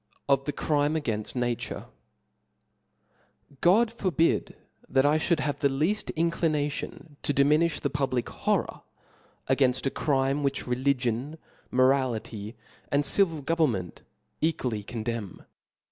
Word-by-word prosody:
Of 135 -1 +3
the 145 - -1
Crime 145 +1 +1
againji 110 -9 -2
Nature^ 120 -1 -2 1.8
/^ 175 - +5
O - - +4
D 225 - -13
forbid 170 - +1 0.3
that 135 +1 +3
I 150 +2 +4
fliould 165 -2 +1
have 145 -2 -2
the 145 - +3
leaft 155 +10 0
in 165 +1 +2
^^ - - -8
clination 150 -1 -2
to - - 0
diminilh 150 +4 +3
the 145 - -1
public 130 -4 -1
horror - - -1 0.7
a 130 - +3
gainft 130 -1 +2
a 135 - +1
crinie 135 -1 +1
which 140 -1 -1
religion, 130 +2 0 0.3
morality, 125 -4 +1 0.4
and 145 0 +2
civil 165 -2 +2
government 135 - 0 0.4
equally 130 -9 0
condemn. 110 -2 -5
140 Hz, 130 wpm, -27 LUFS, 125-155 Hz, 1.8 s, ^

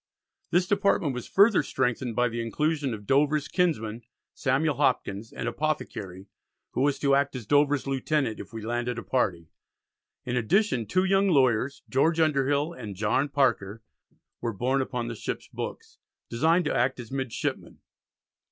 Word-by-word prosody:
This 175 +1 +3
department 195 -7 +1
was 125 -1 -6
further 200 +1 +5
strengthened 125 -2 -1
by 125 0 +3
the 115 0 -3
inclusion 145 +4 -1
of 105 -2 -6
Dover's 145 +4 +2
kinsman, 120 - 0 0.3
Samuel 140 +1 0
Hopkins, 100 +3 0
an - - -5
Apothecary, 115 -9 -3 0.5
who - - -2
was 140 0 +2
to 140 -1 +2
act 140 0 +2
as 125 -4 -6
Dover's 145 +3 +3
lieutenant 135 -2 -1
"if - - -9
we 110 -2 -7
landed 120 +1 -2
a 115 - -5
party." 85 -10 -1 0.7
In 125 - -2
addition 125 - +1
two 185 0 +2
young 195 +1 +3
lawyers, 130 -3 +2
George 160 +5 +2
Underhill 145 0 +2
and 105 - -7
John 110 +8 +1
Parker, 115 -6 0 0.6
were 115 -1 -2
borne 130 +6 0
upon 125 -2 -3
the 120 - -4
ship's 110 - -5
books, - - -7 0.3
"designed 165 +9 +2
to - - 0
act 125 +2 +1
as 120 -1 -9
midshipmen." 130 -4 -4
130 Hz, 155 wpm, -27 LUFS, 115-150 Hz, 0.7 s, further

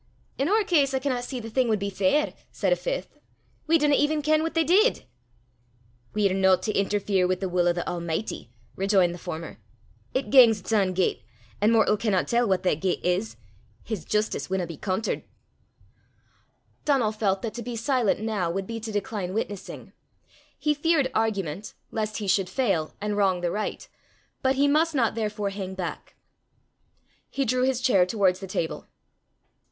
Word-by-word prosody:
"In 275 +4 +1
oor 430 +2 +3
case, 285 -8 +2
I - - +1
canna 260 -3 -1
see 250 +1 -5
the 225 - -7
thing 255 +1 +2
wad 220 -2 +2
be 200 0 -3
fair," 195 +10 +1 0.2
said - - +1
a - - +2
fifth: - - -5 0.5
"we 330 +1 +5
dinna 295 -2 +2
even 295 +1 +2
ken 310 +1 +3
what 325 +1 -3
they 330 - +4
did!" 405 +9 +3 1.1
"We're 200 -3 +2
no 190 -1 +4
to 210 +4 -3
interfere 195 -2 +1
wi' 185 - +1
the 190 +1 -3
wull 175 -1 +1
o' - - +5
the 175 - -4
Almichty," 170 +3 -3 0.3
rejoined 190 -3 +2
the 175 - -9
former. 165 -2 -7 0.6
"It 260 - -1
gangs 240 -5 +7
its 200 - -5
ain 195 -4 +2
gait, 185 0 0 0.4
an' 210 - +4
mortal 220 -2 +4
canna 200 -4 +1
tell 240 0 +1
what 190 -1 +1
that 160 -4 +1
gait 185 - -1
is. 180 +5 0 0.5
His 210 -8 -4
justice 210 +3 -1
winna 190 -1 0
be 165 -1 -8
contert." 190 +6 -2 1.6
Donal 265 -7 +2
felt 205 -2 -1
that 225 - -3
to 240 - -6
be 240 +1 -5
silent 230 -4 +1
now 210 -6 -1
would 190 +3 -2
be 230 +2 -5
to 220 0 -6
decline 200 -2 -3
witnessing. 205 -3 -5 0.6
He 300 - +1
feared 295 -3 +1
argument, 205 -4 -2 0.2
lest 215 -1 -2
he 210 - -4
should 190 -1 +2
fail 190 -9 0
and 210 0 -2
wrong 190 -3 +2
the 175 -1 0
right, 210 +3 -4 0.5
but 265 0 +2
he 280 +2 +3
must 310 +2 +2
not 235 -5 +2
therefore 210 -2 -2
hang 190 -1 -5
back. 180 -3 -6 1.1
He 275 - -1
drew 250 +2 +1
his 260 -1 +1
chair 195 -9 +4
towards 185 -3 +2
the 195 - -7
table. 165 -3 -3
210 Hz, 180 wpm, -26 LUFS, 190-260 Hz, 1.6 s, gangs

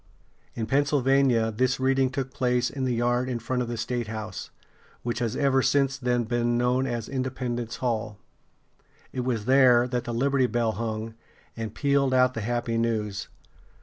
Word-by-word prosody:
In 115 - -2
Pennsylvania 135 -3 +2
this 130 +4 0
reading 135 0 +2
took 130 0 -4
place 125 -2 +1
in 135 -1 -3
the 125 -2 0
yard 120 +2 +1
in 125 - -1
front 125 +2 -2
of 120 - -2
the 120 0 -4
statehouse, 110 -3 -4 0.5
which 120 0 -2
has 115 -3 -1
ever 135 -2 +3
since 135 0 +2
then 125 -2 0
been 120 +1 0
known 125 +2 +1
as 120 -3 -3
Independence 125 -3 -3
Hall. 110 -4 -2 1.0
It - - -4
was 120 -4 -1
there 125 -2 +5
that 125 -1 -2
the 120 - -3
Liberty 135 +2 +2
Bell 120 -2 0
hung, 110 +1 -4 0.4
and 110 -2 -5
pealed 140 -2 +2
out 125 0 +4
the 115 - -4
happy 115 +1 -1
news. 105 -4 -1
120 Hz, 165 wpm, -26 LUFS, 115-130 Hz, 1.0 s, there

